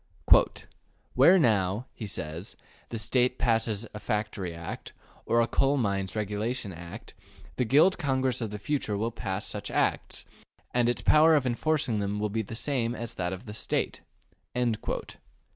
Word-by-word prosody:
'' -, -, -34 dB
``Where 170 Hz, +9 st, +2 dB
now,'' 105 Hz, -, +2 dB
he 110 Hz, -, -6 dB
says, 80 Hz, -1 st, -5 dB, 0.3 s
``the 115 Hz, -, -4 dB
State 125 Hz, +2 st, +1 dB
passes 115 Hz, -3 st, +1 dB
a 105 Hz, -, -6 dB
Factory 105 Hz, -4 st, -2 dB
Act, 85 Hz, 0 st, -7 dB, 0.3 s
or 115 Hz, 0 st, +4 dB
a 115 Hz, -, +2 dB
Coal 135 Hz, +3 st, +2 dB
Mines 100 Hz, -5 st, -1 dB
Regulation 105 Hz, +1 st, -2 dB
Act, 85 Hz, +5 st, -9 dB, 0.4 s
the 125 Hz, -, +1 dB
Guild 155 Hz, +10 st, +4 dB
Congress 130 Hz, -3 st, 0 dB
of 115 Hz, -, -2 dB
the 105 Hz, -, -5 dB
future 110 Hz, -3 st, -2 dB
will 115 Hz, +3 st, -1 dB
pass 95 Hz, -4 st, -4 dB
such -, -, -5 dB
Acts, -, -, -1 dB, 0.5 s
and 120 Hz, -1 st, +3 dB
its 120 Hz, -, 0 dB
power 160 Hz, +1 st, +6 dB
of 145 Hz, -3 st, +2 dB
enforcing 125 Hz, -2 st, 0 dB
them 100 Hz, +1 st, -2 dB
will 105 Hz, 0 st, 0 dB
be 110 Hz, +2 st, -1 dB
the 110 Hz, +1 st, -7 dB
same 120 Hz, -2 st, 0 dB
as 115 Hz, -1 st, -5 dB
that 90 Hz, -1 st, -2 dB
of 95 Hz, +5 st, -7 dB
the 105 Hz, -, -7 dB
State'' 110 Hz, -, -2 dB, 0.5 s
(p. 125 Hz, -2 st, +2 dB
115 Hz, 165 wpm, -28 LUFS, 100-125 Hz, 0.5 s, power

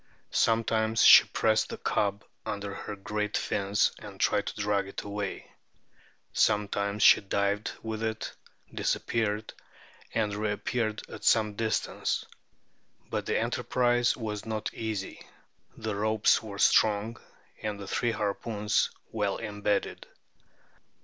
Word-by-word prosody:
Sometimes 110 Hz, 0 st, +2 dB
she -, -, +10 dB
pressed 110 Hz, 0 st, +1 dB
the -, -, -5 dB
cub 100 Hz, 0 st, -1 dB, 0.2 s
under 100 Hz, -1 st, -4 dB
her 105 Hz, -, -6 dB
great 105 Hz, +1 st, -2 dB
fins, 100 Hz, +1 st, +1 dB
and -, -, -11 dB
tried -, -, +2 dB
to -, -, -5 dB
drag 100 Hz, -1 st, 0 dB
it 100 Hz, -, -6 dB
away; 100 Hz, -1 st, -5 dB, 0.8 s
sometimes 100 Hz, 0 st, +1 dB
she -, -, +8 dB
dived 100 Hz, +1 st, -1 dB
with 110 Hz, -1 st, -4 dB
it, 110 Hz, -1 st, -3 dB, 0.4 s
disappeared, 110 Hz, -1 st, -1 dB, 0.6 s
and 105 Hz, -2 st, +1 dB
re 105 Hz, 0 st, -1 dB
appeared 110 Hz, +1 st, -2 dB
at -, -, -10 dB
some 105 Hz, -2 st, +3 dB
distance. 110 Hz, +1 st, -1 dB, 0.9 s
But -, -, -2 dB
the -, -, +1 dB
enterprise 120 Hz, -1 st, +1 dB
was 105 Hz, -4 st, -4 dB
not 110 Hz, -1 st, -4 dB
easy; 110 Hz, -4 st, -4 dB, 0.6 s
the 110 Hz, -2 st, -3 dB
ropes 110 Hz, +1 st, +3 dB
were 105 Hz, -2 st, -8 dB
strong, 110 Hz, +2 st, +3 dB, 0.4 s
and 105 Hz, -1 st, -3 dB
the 100 Hz, -, -8 dB
three 120 Hz, +4 st, 0 dB
harpoons 105 Hz, 0 st, 0 dB, 0.2 s
well 105 Hz, -3 st, -1 dB
embedded." 105 Hz, -2 st, -2 dB
105 Hz, 125 wpm, -29 LUFS, 100-110 Hz, 0.9 s, she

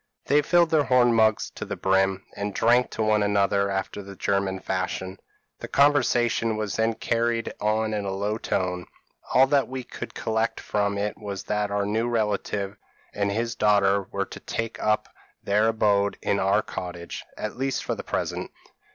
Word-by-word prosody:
p> -, -, -1 dB
"They 150 Hz, -, +6 dB
filled 170 Hz, +2 st, +3 dB
their 155 Hz, -3 st, +3 dB
horn 125 Hz, -2 st, +4 dB
mugs 110 Hz, -1 st, +2 dB
to -, -, -7 dB
the -, -, -4 dB
brim, 95 Hz, 0 st, +1 dB
and 100 Hz, 0 st, -4 dB
drank 120 Hz, +2 st, +3 dB
to 110 Hz, -, -2 dB
one 110 Hz, -1 st, +3 dB
another 100 Hz, -1 st, +2 dB
after 95 Hz, +1 st, -3 dB
the 100 Hz, 0 st, -10 dB
German 100 Hz, -1 st, 0 dB
fashion. 95 Hz, 0 st, -3 dB, 0.4 s
The -, -, -6 dB
conversation 120 Hz, -5 st, +3 dB
was 105 Hz, -2 st, -2 dB
then 110 Hz, 0 st, +1 dB
carried 115 Hz, 0 st, -1 dB
on 110 Hz, +1 st, +1 dB
in 105 Hz, -1 st, -1 dB
a 100 Hz, -, -3 dB
low 100 Hz, +3 st, -2 dB
tone; 90 Hz, -3 st, -2 dB, 0.5 s
all 130 Hz, +1 st, +8 dB
that 140 Hz, 0 st, +2 dB
we 130 Hz, 0 st, -5 dB
could -, -, -8 dB
collect 110 Hz, 0 st, -1 dB
from 100 Hz, -1 st, -1 dB
it 105 Hz, +1 st, -2 dB
was 100 Hz, -2 st, -5 dB
that 105 Hz, -1 st, -1 dB
our 100 Hz, 0 st, 0 dB
new 110 Hz, +3 st, 0 dB
relative 105 Hz, -3 st, -1 dB, 0.4 s
and 100 Hz, -1 st, 0 dB
his 115 Hz, +2 st, -1 dB
daughter 100 Hz, -2 st, +3 dB
were 100 Hz, 0 st, -1 dB
to -, -, -10 dB
take 115 Hz, 0 st, -4 dB
up 105 Hz, 0 st, +1 dB, 0.4 s
their 105 Hz, +2 st, +2 dB
abode 105 Hz, -3 st, +2 dB
in 100 Hz, -, +1 dB
our 95 Hz, +1 st, +2 dB
cottage, 85 Hz, -1 st, -6 dB
at 105 Hz, +1 st, -5 dB
least 135 Hz, +1 st, -1 dB
for -, -, -2 dB
the -, -, -6 dB
present. -, -, -3 dB
105 Hz, 180 wpm, -25 LUFS, 100-115 Hz, 0.5 s, all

